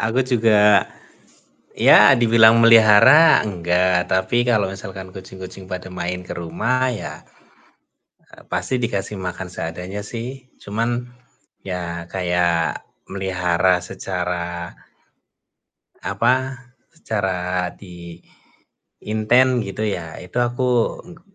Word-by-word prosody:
Aku 115 +3 0
juga 110 -5 +3 0.9
ya, - - +7
dibilang 115 -1 +5
memelihara 115 +7 +6
enggak, 90 -1 0
tapi 95 +5 +1
kalau 110 -5 +2
misalkan 95 -1 -9
kucing-kucing 95 0 -10
pada 90 -1 -6
main 90 0 -4
ke - - -8
rumah 120 +10 -1
ya, 115 - -7 1.3
pasti 130 - -2
dikasih 100 -3 -3
makan 90 0 -6
seadanya 90 +4 -6
sih, 125 +3 -8
cuman 120 +4 -3 0.6
ya 85 -2 -5
kayak 90 -3 -1 0.2
melihara 90 -2 0
secara 90 -2 -5 1.3
apa, 125 - +1 0.6
secara 90 - -2
di 85 -2 -12 0.8
inten 120 +4 +2
gitu 100 +1 -7
ya 85 -6 -5
itu 90 +5 -13
aku 120 +1 0 0.4
engg 170 -2 -14
95 Hz, 95 wpm, -20 LUFS, 90-115 Hz, 1.3 s, ya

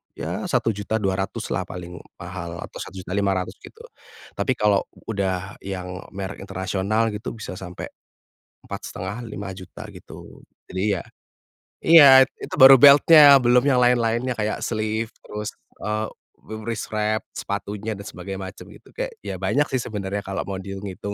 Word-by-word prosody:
ya - - -4
Rp1.200.000 100 -2 -1
lah - - -1
paling 90 0 -8 0.2
mahal 85 -1 -7
atau - - -9
Rp1.500.000 95 0 -2
gitu. - - -14 0.6
Tapi - - 0
kalau 105 -2 +3 0.3
udah 95 -2 -2
yang 90 -1 -5
merek 95 0 -6
internasional 100 +3 -1
gitu, 105 - -5
bisa 110 -4 -7
sampai, 90 -2 -7 0.8
Rp4.500.000-Rp5.000.000 100 -2 -7
gitu. - - -13 0.3
Jadi 95 +2 0
ya - - -6 0.8
iya, 140 -5 +9 0.2
itu - - -6
baru 135 -1 +10
belt-nya, 145 +1 +9
belum 125 +1 +4
yang 130 -3 +4
lain-lainnya, 120 0 +2
kayak 105 0 -1
sleeve 110 0 -2
terus, 105 0 -5 0.3
eee, 110 +1 -2 0.4
wi 110 - -8
wrist 115 -1 -4
wrap 110 0 0 0.2
sepatunya 105 +2 -4
dan - - -7
sebagai 95 0 -7
macam 95 0 -8
gitu, - - -17
kayak - - -3
ya, - - -4
banyak 145 0 +1
sih 130 -2 0
sebenarnya 100 -2 -4
kalau 95 0 -3
mau 100 - -3
dihitung 95 +1 -7
hitung. 100 +2 -6
105 Hz, 140 wpm, -23 LUFS, 95-115 Hz, 0.8 s, baru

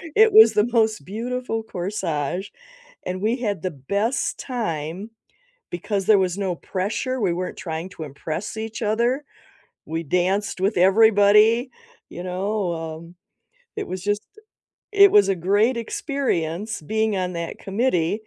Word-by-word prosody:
it 440 0 +6
was 440 +1 +9
the 210 +2 +3
most 220 -2 +2
beautiful 230 +2 -3
corsage, 180 -3 -3 0.6
and 185 +1 -4
we 225 +4 +1
had 205 -8 -2
the 185 0 -2
best 200 - -2
time 190 - -4 0.6
because 195 +3 -2
there 215 -2 +7
was 185 -1 0
no 190 -3 -1
pressure, 220 +9 -3
we 185 -4 +2
weren't 180 +1 -4
trying 165 +1 -5
to 175 - -12
impress 155 +8 -5
each 225 +1 -5
other, 235 +6 +1 0.6
we 165 +1 -3
danced 185 +5 0
with 200 +3 +1
everybody, 210 +5 +5 0.4
you 175 - -7
know, 185 0 -2 0.2
um, 170 +1 -13 0.6
it 420 - -3
was 185 -1 -5
just 205 +1 -1 0.7
it 400 -1 +7
was 200 -1 +5
a 195 - +2
great 205 +8 +2
experience 215 - -2
being 220 +6 0
on 180 -1 -2
that 170 -1 -5
committee. 200 -2 0
200 Hz, 140 wpm, -23 LUFS, 180-225 Hz, 0.7 s, was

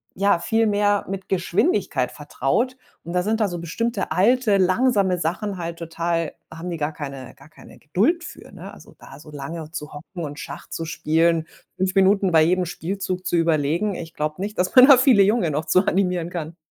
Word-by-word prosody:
ja, 200 -2 +2
viel 225 +5 +1
mehr 205 -1 +1
mit 195 0 -6
Geschwindigkeit 180 -6 0
vertraut. 150 - -1 0.3
Und 170 - -7
da 180 - +2
sind 220 +4 -1
da 215 - +2
so 175 -2 -5
bestimmte 200 +5 -3
alte, 210 +5 +3
langsame 190 -1 +2
Sachen 185 +5 -2
halt 170 -1 -5
total 165 -1 -2 0.2
haben 165 +2 -7
die 170 - -4
gar 150 0 -2
keine 135 -4 -8
gar - - -18
keine - - -16
Geduld 230 - 0
für, - - -11
ne? - - -10
Also, - - -16
da 135 - -13
so 150 - -14
lange 150 +2 -7
zu 150 -3 -7
hocken 165 +4 -8
und 145 -1 -6
Schach - - -8
zu 165 - -5
spielen, 165 +1 +1 0.3
5 185 0 0
Minuten 195 0 +3
bei 160 -1 +5
jedem 180 +2 +2
Spielzug 185 +2 -4
zu - - 0
überlegen. 165 +4 +1
Ich 165 -1 -8
glaube 155 +3 -3
nicht, 210 +2 -4
dass 180 +5 -1
man 255 0 +9
da 275 -3 +9
viele 255 -5 +5
Junge 200 -5 +2
noch 150 +2 -2
zu 185 +5 +3
animieren 180 -3 0
kann. 165 -2 -5
180 Hz, 200 wpm, -22 LUFS, 160-200 Hz, 0.3 s, man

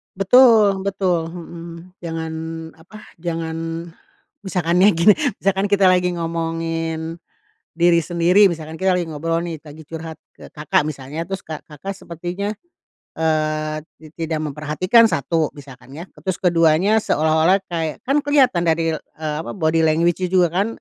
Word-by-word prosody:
Betul 210 0 +5
betul. 185 -4 0
Mhm. 170 +1 -10
Jangan 165 -1 -5 0.4
apa, 185 +7 -15 0.2
jangan 165 0 -4 0.5
misalkan 180 - 0
ya 190 - +7
gini, 170 +6 +6 0.2
misalkan 195 0 0
kita 195 -2 +4
lagi 180 -1 +1
ngomongin 165 0 -3 0.6
diri 170 0 +4
sendiri. 175 +5 +4
Misalkan 160 -2 -6
kita 190 -1 +2
lagi 180 - -1
ngobrol 165 +3 -1
nih, 165 -3 -6
lagi 155 +1 -13
curhat 160 +1 -8 0.2
ke - - -13
Kakak 150 0 0
misalnya, 150 +3 -6
terus 195 0 -5
Kakak 155 +4 -7
sepertinya, 180 +1 -5 0.7
eee, 155 -1 0 0.2
ti 160 - -13
tidak 160 -1 -3
memperhatikan, 170 - +3
1, 155 +3 0
misalkan 135 -3 -14
ya, 165 - -7 0.2
terus 190 -2 -1
ke-2-nya 175 +4 +3
seolah-olah 160 +5 +3
kayak, 165 -3 -3
kan 275 +2 +3
keliatan 265 -11 +3
dari, 165 0 +1
eee, 155 -1 -6
apa - - -6
body 160 -3 +1
language-nya 170 +3 +2
juga 180 -2 +4 0.2
kan, - - -3
165 Hz, 140 wpm, -20 LUFS, 160-185 Hz, 0.7 s, ya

